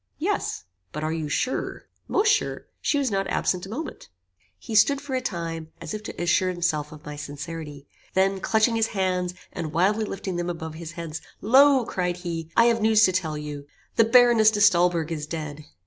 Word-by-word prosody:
"Yes." - - -2 0.3
"But 150 - -5
are 155 +1 -1
you 160 -2 -3
sure?" 255 - -2 0.2
"Most 420 +2 +2
sure. 410 - -2 0.2
She 290 - +1
was 275 -4 0
not 195 -1 0
absent 180 0 0
a - - -11
moment." 285 - -6 0.5
He 220 - -8
stood, 245 +7 +5
for 280 -1 -7
a 255 - 0
time, 165 -6 -4
as - - -6
if 215 - -4
to 215 - -8
assure 175 +2 +2
himself 170 -4 -1
of 150 -1 -12
my 150 - -6
sincerity. 145 0 -7 0.3
Then, 195 +1 +2
clinching 220 +3 +2
his 225 0 +2
hands, 180 -1 0 0.2
and 165 -4 -5
wildly 200 +6 +2
lifting 190 -3 -4
them 175 0 -2
above 160 -2 -5
his 165 +1 -8
head, 165 -2 -5 0.2
"Lo," 265 +3 +5
cried 180 -3 -2
he, 165 -3 -5
"I 230 - +7
have 230 -1 +3
news 220 0 +5
to 185 - +2
tell 165 -5 -1
you. 145 -1 -7 0.3
The 230 - +5
Baroness 235 -2 +6
de 210 -1 -1
Stolberg 175 -4 +4
is 150 -2 -4
dead?" 155 -2 -6
180 Hz, 195 wpm, -25 LUFS, 160-220 Hz, 0.5 s, I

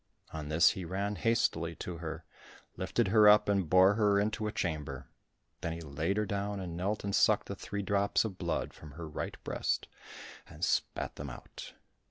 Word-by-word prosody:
On 75 -2 -5
this 80 +3 +5
he 95 - -5
ran 100 +4 -2
hastily 85 -8 +1
to 85 +1 -6
her, 80 0 -6 0.5
lifted 120 -5 0
her 105 0 +7
up 105 0 +6
and 100 -5 +1
bore 95 +3 +6
her 105 -2 +3
into 110 +1 -1
a - - -2
chamber—then 80 0 -6
he 85 - -7
laid 80 +6 -2
her 105 - +1
down, 100 +1 -2
and 90 -3 -5
knelt 100 +5 -2
and 100 0 -2
sucked - - +4
the - - -4
three 100 0 -5
drops 100 +2 +2
of 95 -4 -5
blood - - -2
from 75 -2 -12
her 80 +2 -7
right 75 - -5
breast, - - -1 0.6
and - - -3
spat - - -1
them 70 0 -5
out. - - -10
95 Hz, 185 wpm, -32 LUFS, 80-100 Hz, 0.6 s, her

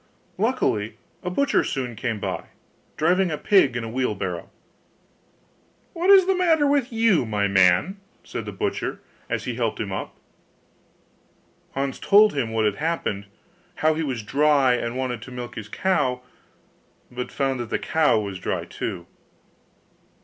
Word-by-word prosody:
Luckily 105 +1 0 0.2
a 180 - -3
butcher 275 +9 +2
soon 125 -4 -3
came 115 -1 -3
by, - - -4 0.5
driving 180 +4 +2
a 150 - -2
pig 145 -7 +3
in 120 - -3
a - - -4
wheelbarrow. 105 -8 -2 1.4
'What 350 +2 -1
is 390 -2 +8
the 385 - +3
matter 335 -5 +3
with 280 -3 +1
you, 225 - +3
my 105 -3 0
man?' 95 - +3 0.3
said - - -6
the - - -5
butcher, - - -3 0.3
as - - -2
he 125 - -3
helped 115 -2 -2
him 105 -3 -3
up. 95 - -5 1.6
Hans 135 0 -2
told 210 +1 +5
him 135 -6 -1
what 110 -1 +1
had 105 -1 0
happened, 145 -11 -2 0.6
how 155 - +5
he 160 - -2
was 130 -8 -3
dry, 140 +2 +3
and 120 0 -2
wanted 125 -3 -2
to 130 - -10
milk 125 -1 -6
his 110 -3 -8
cow, 125 - 0 0.9
but 125 0 -5
found 135 -2 -1
the 120 -2 -2
cow 160 -7 +2
was 100 -3 -5
dry - - -2
too. - - -5
130 Hz, 150 wpm, -24 LUFS, 110-180 Hz, 1.6 s, is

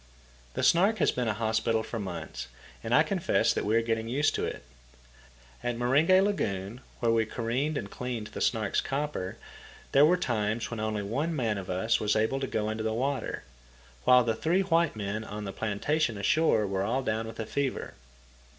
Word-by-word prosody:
The - - -1
Snark 195 +6 +4
has - - +3
been 125 -2 -2
a 110 - 0
hospital 110 0 0
for 115 - -5
months, 90 - -6 0.4
and - - -4
I - - +6
confess - - +1
that - - -2
we 105 +2 +2
are 115 - +3
getting 115 0 -1
used 145 +4 +2
to - - -1
it. - - -5 1.0
At 120 -1 -1
Meringe 130 +7 +2
Lagoon, 110 - -2 0.2
where 115 - +3
we 115 -1 +3
careened 130 +7 -1
and 100 - -4
cleaned 125 -3 -4
the - - -5
Snark's 110 -4 +1
copper, 135 -10 -3 0.5
there 140 - +6
were 175 +4 +5
times 115 -7 -1
when 115 - -4
only 110 -1 -2
one 145 +11 -1
man 110 -7 0
of 95 - -8
us 100 +5 +1
was 105 -1 +1
able 110 +5 +1
to 135 - -2
go 105 -3 -1
into 110 0 -3
the 110 0 -1
water, 135 +1 -2 0.6
while 125 0 +6
the 115 -1 +1
three 165 +11 +1
white 170 -6 +2
men 105 +1 -3
on 105 -1 -6
the 95 - -5
plantation 115 +4 0
ashore 110 - +3
were 95 -1 -1
all 120 +7 0
down 110 -1 -1
with 110 0 -9
fever. 140 -2 -2
115 Hz, 190 wpm, -29 LUFS, 110-135 Hz, 1.0 s, I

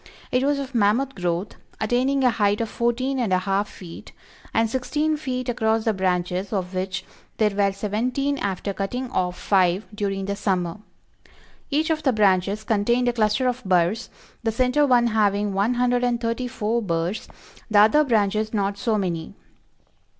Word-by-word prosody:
It 250 - +2
was 285 +1 +2
of 275 -1 -5
mammoth 235 +5 +2
growth, 180 0 -3 0.2
attaining 255 +5 +1
a 250 - +5
height 205 -2 +1
of 230 -1 -2
fourteen 255 +3 -1
and 230 -6 0
a 185 - +4
half 195 +2 -1
feet, 170 -3 -11 0.4
and 225 0 +2
sixteen 295 +6 -1
feet 255 -4 -4
across 225 -2 +1
the 220 - +2
branches 185 0 -1
of 190 -3 -2
which 185 0 -3 0.3
there 215 -1 +3
were 200 0 +2
seventeen 245 +8 -1
after 200 0 -2
cutting 245 +7 -4
off 180 -1 -1
five 185 0 +2
during 195 -2 -2
the 200 0 -2
summer. 190 -2 -1 0.9
Each 310 +3 +1
of 310 -1 0
the 265 -4 +2
branches 200 0 +2
contained 235 +4 +1
a - - -1
cluster 225 +3 +1
of 250 0 -2
burs, 185 +4 +1 0.3
the 225 - 0
center 255 +5 +2
one 245 -2 +4
having 205 -2 +1
one 205 +6 +1
hundred 245 0 +1
and 240 -1 +1
thirty 230 +2 -2
four 230 0 -1
burs, 170 0 -2 0.4
the 215 - +2
other 260 +9 +5
branches 215 -3 +1
not 200 0 -1
so 225 -1 +1
many. 170 -5 -3
215 Hz, 170 wpm, -23 LUFS, 195-250 Hz, 0.9 s, a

